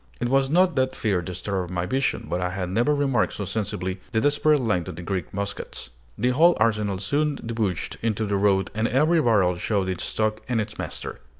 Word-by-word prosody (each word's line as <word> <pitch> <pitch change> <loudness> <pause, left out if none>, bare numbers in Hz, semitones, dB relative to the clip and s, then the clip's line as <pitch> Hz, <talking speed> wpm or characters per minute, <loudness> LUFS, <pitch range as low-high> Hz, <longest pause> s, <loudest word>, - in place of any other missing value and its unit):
It 120 - -1
was 135 0 +3
not 180 +3 +3
that 130 0 +1
fear 100 -5 0
disturbed 90 +1 -3
my 90 -1 -2
vision; 130 +8 0
but 90 - -2
I 90 - 0
had 90 -1 -4
never 120 +9 +2
remarked 135 -6 +1
so 100 - -4
sensibly 95 -2 -3
the 110 - +3
desperate 145 +2 +3
length 105 -9 0
of - - -6
the 90 - -8
Greek 90 -2 -3
muskets! 100 -9 -5 0.3
The 125 - +1
whole 165 +7 +5
arsenal 105 -3 +1
soon 145 +9 0
debouched 110 -8 -3
into 110 -1 0
the 100 -1 -1
road, 95 -1 +2
and 110 +2 0
every 155 +5 +3
barrel 100 - +3
showed 95 +1 0
its 95 -1 -3
stock 110 0 -1
and 120 -2 +1
its 105 - -4
master. - - -5
110 Hz, 205 wpm, -24 LUFS, 95-130 Hz, 0.3 s, whole